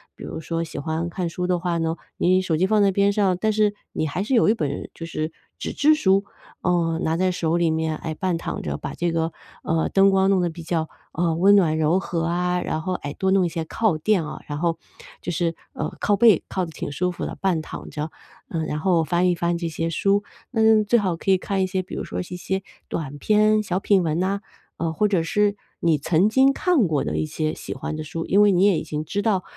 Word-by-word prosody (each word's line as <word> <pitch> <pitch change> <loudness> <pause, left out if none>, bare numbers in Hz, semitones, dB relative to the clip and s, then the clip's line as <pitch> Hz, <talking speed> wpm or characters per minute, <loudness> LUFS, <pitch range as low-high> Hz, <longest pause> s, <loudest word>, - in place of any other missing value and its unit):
比 - - -11
如 - - -6
说 165 +1 -2
喜 165 - -6
欢 160 +3 -2
看 175 0 -3
书 180 +2 -3
的 180 -1 +1
话 175 -1 -1
呢， 165 0 -1 0.2
你 185 +1 +3
手 170 -4 0
机 180 - +3
放 210 +2 +3
在 200 -1 +4
边 200 +1 +2
上， 195 -3 +2
但 215 +1 +1
是 210 -1 +2 0.2
你 155 - -1
还 180 +6 -2
是 260 - -2
有 225 -3 +5
一 - - +5
本 145 -8 -3
就 165 - -7
是 155 -1 -3 0.3
纸 - - -4
质 295 +1 +4
书， 195 -8 +2 0.4
呃， 170 -2 +1
拿 160 - +1
在 185 +1 +2
手 165 -2 0
里 170 -1 +2
面， 160 0 0
哎， 160 -1 -5
半 185 0 -1
躺 - - -5
着， - - -3
把 - - -6
这 170 -1 0
个， 165 0 0 0.3
呃， 165 0 +1
灯 195 0 +5
光 190 0 +3
弄 190 -2 +3
得 175 - +1
比 165 +1 -9
较， 160 -1 -1 0.2
呃， 165 -1 0
温 195 +4 +5
暖 165 -6 +3
柔 160 +4 +3
和 170 -3 -2
啊， 180 +1 0
然 155 - -2
后， 185 +3 -2
哎， 145 -5 -5
多 190 - -1
弄 190 -2 +4
一 - - 0
些 165 0 -3
靠 215 +1 +1
垫 190 -2 +2
啊， 150 - -7
然 145 - -4
后 165 +1 0 0.4
就 175 - -3
是， 165 0 -1 0.2
呃， - - -4
靠 205 - +2
背 215 -4 +5
靠 185 -1 -1
得 165 - -9
挺 145 - -5
舒 180 +5 -1
服 - - -5
的， - - -7
半 180 -5 +1
躺 - - -8
着， 150 +1 -4 0.4
嗯， 160 -2 -2
然 150 - -3
后 170 -1 +2
翻 175 +3 +2
一 175 - +2
翻 170 0 0
这 170 0 -3
些 165 0 -2
书， 200 +4 +1 0.3
那 220 -2 +4
最 235 +3 +3
好 185 -4 0
可 165 - -5
以 190 - +5
看 195 +1 -2
一 - - 0
些， 185 0 -1
比 - - -12
如 - - -3
说 - - -5
一 - - -4
些 180 +2 -4 0.3
短 145 -3 -4
篇 215 +2 +3
小 185 -2 -1
品 195 -1 +3
文 165 +2 0
啊， 200 +1 -1 0.4
呃， 165 -1 -2
或 210 +6 +2
者 185 -5 +1
是 205 +4 +1 0.2
你 165 -3 +2
曾 170 +7 +2
经 265 +4 +4
看 295 - +2
过 150 -3 0
的 75 +1 -2
一 80 - 0
些 155 - -2
喜 - - -6
欢 155 - -5
的 155 - -4
书， 165 +2 -5
因 200 - +4
为 205 - +5
你 185 0 +3
也 195 -5 +4
已 - - -5
经 155 -1 -4
知 200 +6 -2
道 195 -5 +1
175 Hz, 270 characters per minute, -23 LUFS, 160-195 Hz, 0.4 s, 有